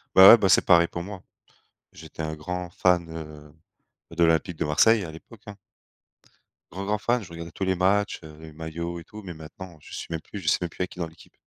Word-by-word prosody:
Bah 95 Hz, +1 st, +11 dB
ouais, 120 Hz, -, +11 dB
bah, 100 Hz, -4 st, +1 dB
c'est -, -, +5 dB
pareil 85 Hz, -1 st, +6 dB
pour 85 Hz, -, -6 dB
moi. 95 Hz, 0 st, -9 dB, 0.7 s
J'étais 80 Hz, 0 st, -9 dB
un 80 Hz, 0 st, -3 dB
grand 90 Hz, +3 st, -5 dB
fan, 90 Hz, -1 st, +2 dB
heu, 75 Hz, -2 st, -9 dB, 0.6 s
de 85 Hz, -, +3 dB
l'Olympique 80 Hz, +1 st, +2 dB
de -, -, -1 dB
Marseille 105 Hz, +9 st, +4 dB
à 80 Hz, -, -7 dB
l'époque, 95 Hz, +7 st, -14 dB
hein. 105 Hz, -, -9 dB, 1.1 s
Grand, 95 Hz, +3 st, -5 dB
grand 105 Hz, +1 st, 0 dB
fan, 120 Hz, +2 st, 0 dB
je 95 Hz, -, -12 dB
regardais 85 Hz, 0 st, -8 dB
tous 95 Hz, -, -5 dB
les 95 Hz, -, +2 dB
matchs, 100 Hz, +3 st, +1 dB
heu, 75 Hz, -1 st, -12 dB
les 80 Hz, -1 st, -11 dB
maillots 85 Hz, +2 st, -5 dB
et -, -, -11 dB
tout, 105 Hz, +5 st, -12 dB
mais 90 Hz, -3 st, -7 dB
maintenant 80 Hz, +3 st, -11 dB
je -, -, -15 dB
suis -, -, -5 dB
même 80 Hz, -1 st, -3 dB
plus 105 Hz, -, -10 dB
je 80 Hz, -, -9 dB
sais -, -, +3 dB
même 85 Hz, -, -2 dB
plus -, -, -19 dB
il 90 Hz, -, +2 dB
y -, -, 0 dB
a -, -, -14 dB
qui 90 Hz, -, -14 dB
dans 85 Hz, -, -2 dB
l'équipe. 80 Hz, +1 st, -18 dB
85 Hz, 250 wpm, -25 LUFS, 80-95 Hz, 1.1 s, Bah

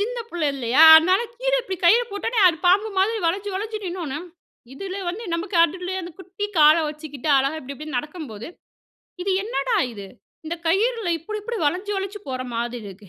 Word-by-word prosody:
சின்ன 485 Hz, +4 st, -2 dB
புள்ளை 335 Hz, -4 st, -1 dB
இல்லயா? 260 Hz, +3 st, +2 dB
அதனால 370 Hz, +6 st, +4 dB, 0.2 s
கீழ -, -, -1 dB
இப்டி 385 Hz, -5 st, -5 dB
கயிறு 460 Hz, +8 st, +6 dB
போட்ட 405 Hz, -, -5 dB
ஓடனே 470 Hz, -, +1 dB
அது 330 Hz, -, 0 dB
பாம்பு 405 Hz, +5 st, +4 dB
மாரி 435 Hz, +4 st, +2 dB
வளைஞ்சி, 390 Hz, +4 st, -1 dB
வளைஞ்சி 430 Hz, +3 st, -4 dB
நின்னோனே, 340 Hz, -6 st, -4 dB, 0.6 s
இதுல 390 Hz, +5 st, -6 dB
வந்து 410 Hz, +7 st, -5 dB
நமக்கு 350 Hz, +2 st, -3 dB
அதிலேயே 360 Hz, +3 st, -3 dB
அந்த 345 Hz, -, -7 dB
குட்டி 380 Hz, +2 st, -6 dB
கால 305 Hz, +1 st, +7 dB
வச்சுக்கிட்டு 300 Hz, -1 st, -7 dB
அழகா 275 Hz, +4 st, -1 dB
இப்டி 275 Hz, +2 st, -8 dB
இப்டின்னு 305 Hz, -2 st, -6 dB
நடக்கும்போது, 295 Hz, -, -7 dB, 0.8 s
இது 390 Hz, -, -1 dB
என்னடா 465 Hz, +1 st, -1 dB, 0.2 s
இது? 200 Hz, -2 st, -9 dB, 0.4 s
இந்த 340 Hz, +2 st, -3 dB
கயிறுல 435 Hz, +4 st, +1 dB
இப்டி, 425 Hz, +7 st, -6 dB
இப்டி 470 Hz, +1 st, -4 dB
வளைஞ்சி 370 Hz, +7 st, -1 dB
வளைஞ்சு 390 Hz, +1 st, -5 dB
போற 255 Hz, -1 st, -3 dB
மாதிரி 240 Hz, 0 st, -3 dB
இருக்கு. 195 Hz, +1 st, -12 dB
355 Hz, 180 wpm, -23 LUFS, 295-410 Hz, 0.8 s, கால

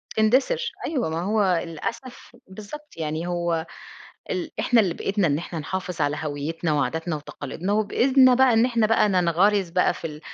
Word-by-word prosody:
تندثِر. 275 Hz, -, +2 dB, 0.2 s
أيوه 265 Hz, -, -1 dB
ما 160 Hz, +1 st, -2 dB
هو 195 Hz, -3 st, +1 dB
للأسف 240 Hz, -, -7 dB
بالضبط 215 Hz, +11 st, -10 dB
يعني 160 Hz, +1 st, -3 dB
هو 170 Hz, -2 st, -1 dB, 0.7 s
ال 340 Hz, -4 st, -3 dB
إحنا 240 Hz, -2 st, +4 dB
اللي 185 Hz, -6 st, 0 dB
بإيدنا 195 Hz, 0 st, 0 dB
إن 145 Hz, -1 st, +1 dB
إحنا 170 Hz, 0 st, -6 dB
نحافِظ 180 Hz, +2 st, -5 dB
على 145 Hz, +1 st, +1 dB
هويّتنا 155 Hz, +2 st, -3 dB
وعاداتنا 160 Hz, +2 st, -1 dB
وتقاليدنا 150 Hz, +5 st, -5 dB
وبإيدنا 255 Hz, +5 st, +4 dB
بقى 260 Hz, -1 st, +4 dB
إن 225 Hz, +1 st, +4 dB
إحنا 235 Hz, -3 st, +2 dB
بقى 215 Hz, -1 st, +3 dB
ننغَرِز 185 Hz, +1 st, +2 dB
بقى 180 Hz, +1 st, +2 dB
في -, -, -6 dB
ال 150 Hz, -1 st, -9 dB
185 Hz, 165 wpm, -24 LUFS, 165-225 Hz, 0.7 s, إحنا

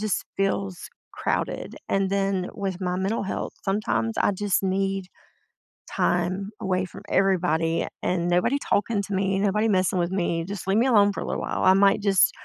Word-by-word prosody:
just 215 Hz, -1 st, -1 dB
feels 195 Hz, -1 st, -1 dB, 0.2 s
crowded, -, -, -2 dB
and 195 Hz, -1 st, +1 dB
then 195 Hz, -2 st, 0 dB
with 195 Hz, -3 st, -3 dB
my 180 Hz, -1 st, -1 dB
mental 195 Hz, +4 st, -1 dB
health, 190 Hz, -, -4 dB
sometimes 115 Hz, -, 0 dB
I -, -, +3 dB
just 200 Hz, 0 st, 0 dB
need 195 Hz, 0 st, -1 dB, 0.8 s
time 180 Hz, +3 st, 0 dB
away 185 Hz, 0 st, 0 dB
from -, -, -11 dB
everybody, 170 Hz, -4 st, +1 dB, 0.2 s
and 175 Hz, -1 st, 0 dB
nobody 180 Hz, +10 st, +2 dB
talking 210 Hz, -4 st, 0 dB
to 200 Hz, -, -5 dB
me, 195 Hz, 0 st, +1 dB
nobody 210 Hz, +2 st, +2 dB
messing 185 Hz, -2 st, +2 dB
with 170 Hz, +1 st, 0 dB
me. 170 Hz, -3 st, -1 dB
Just 195 Hz, +1 st, -6 dB
leave 195 Hz, +2 st, +2 dB
me 240 Hz, +4 st, +3 dB
alone 205 Hz, -5 st, +5 dB
for -, -, -5 dB
a -, -, -4 dB
little -, -, -2 dB
while. -, -, -2 dB
I 185 Hz, -, +7 dB
might 195 Hz, +1 st, +4 dB
just 195 Hz, -2 st, +4 dB
195 Hz, 180 wpm, -25 LUFS, 180-200 Hz, 0.8 s, I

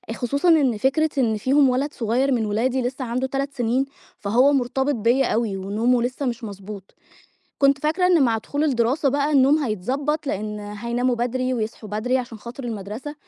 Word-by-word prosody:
خصوصًا 280 Hz, +9 st, 0 dB
إن 280 Hz, -9 st, +4 dB
فكرة 285 Hz, +7 st, +2 dB
إن 225 Hz, -5 st, +2 dB
فيهم 270 Hz, +4 st, +3 dB
ولد 270 Hz, +4 st, -1 dB
صغير 250 Hz, +4 st, 0 dB
من 235 Hz, -3 st, +1 dB
ولادي 240 Hz, +5 st, 0 dB
لسه 255 Hz, +2 st, -3 dB
عنده 250 Hz, +2 st, -2 dB
3 275 Hz, +1 st, -3 dB
سنين، 250 Hz, +1 st, 0 dB, 0.3 s
فهو 245 Hz, +8 st, +3 dB
مرتبط 265 Hz, +2 st, 0 dB
بيَّ 235 Hz, +4 st, +2 dB
أوي 225 Hz, -5 st, 0 dB
ونومُه 225 Hz, +6 st, +1 dB
لسه 255 Hz, +3 st, -3 dB
مش 240 Hz, -1 st, -3 dB
مضبوط، 200 Hz, -1 st, -9 dB, 0.6 s
كنت 275 Hz, 0 st, +4 dB
فاكرة 320 Hz, +6 st, +1 dB
إن 345 Hz, -5 st, +4 dB
مع 230 Hz, -3 st, +2 dB
دخول 285 Hz, +7 st, -2 dB
الدراسة 265 Hz, +1 st, +1 dB
بقى 285 Hz, +2 st, 0 dB
النوم 280 Hz, +2 st, +5 dB
هيتضبَّط 275 Hz, -, -2 dB
لأن 210 Hz, -3 st, -3 dB
هيناموا 235 Hz, +5 st, -2 dB
بدري، 255 Hz, +2 st, -1 dB
ويصحوا 220 Hz, -1 st, -4 dB
بدري، 235 Hz, +5 st, 0 dB
عشان 240 Hz, -3 st, -6 dB
خاطر 240 Hz, +4 st, -9 dB
المدرسة، 225 Hz, +5 st, -6 dB
250 Hz, 170 wpm, -23 LUFS, 225-275 Hz, 0.6 s, النوم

